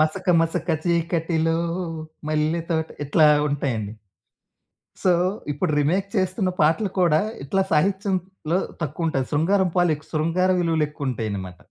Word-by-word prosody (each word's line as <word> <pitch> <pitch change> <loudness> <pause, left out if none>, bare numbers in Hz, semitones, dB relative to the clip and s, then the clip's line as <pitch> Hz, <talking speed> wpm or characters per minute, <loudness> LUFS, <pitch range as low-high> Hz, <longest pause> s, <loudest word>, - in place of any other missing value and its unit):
మసక 170 +4 +1
మసక 165 +1 -1 0.2
చీకటిలో 165 -1 +1 0.7
మల్లెతోట, 160 +1 0 0.2
ఇట్లా 155 +2 +4 0.2
ఉంటాయండి. 120 -7 -2 1.1
సో, 185 - +5 0.4
ఇప్పుడు 145 +1 -1
రీమేక్ 185 +7 +1
చేస్తున్న 185 0 +1
పాటలు 165 +7 +2
కూడా, 160 -3 +4 0.2
ఇట్లా 190 +8 0
సాహిత్యంలో 190 0 0 0.2
తక్కువుంటాయి. 155 -3 -1
శృంగారం 185 +5 +2
పాలెక్స్ 155 -4 +1
శృంగార 165 +4 +1
విలువలెక్కువుంటాయనమాట. 130 - -2
165 Hz, 95 wpm, -23 LUFS, 150-180 Hz, 1.1 s, సో